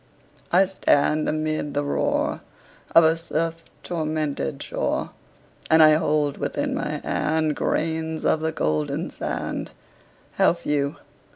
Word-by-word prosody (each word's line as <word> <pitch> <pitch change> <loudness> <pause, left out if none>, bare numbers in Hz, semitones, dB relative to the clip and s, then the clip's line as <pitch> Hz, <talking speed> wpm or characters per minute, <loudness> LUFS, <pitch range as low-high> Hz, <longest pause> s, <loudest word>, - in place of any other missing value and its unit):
I 185 +3 +5
stand 155 -5 +2
amid 155 -1 -2
the 145 - +1
roar 145 - 0 0.5
Of 165 - +9
a 160 +1 +4
surf 165 0 -3 0.2
tormented 155 - -2
shore, - - -2 0.6
And 160 0 +7
I 155 - +8
hold 150 -2 +1
within - - -2
my - - -3
hand 155 0 0
Grains 160 0 -1
of 160 - +3
the 160 0 -1
golden 75 - -1
sand - - -4 0.7
How - - +5
few! 145 -1 -1
155 Hz, 120 wpm, -24 LUFS, 150-160 Hz, 0.7 s, Of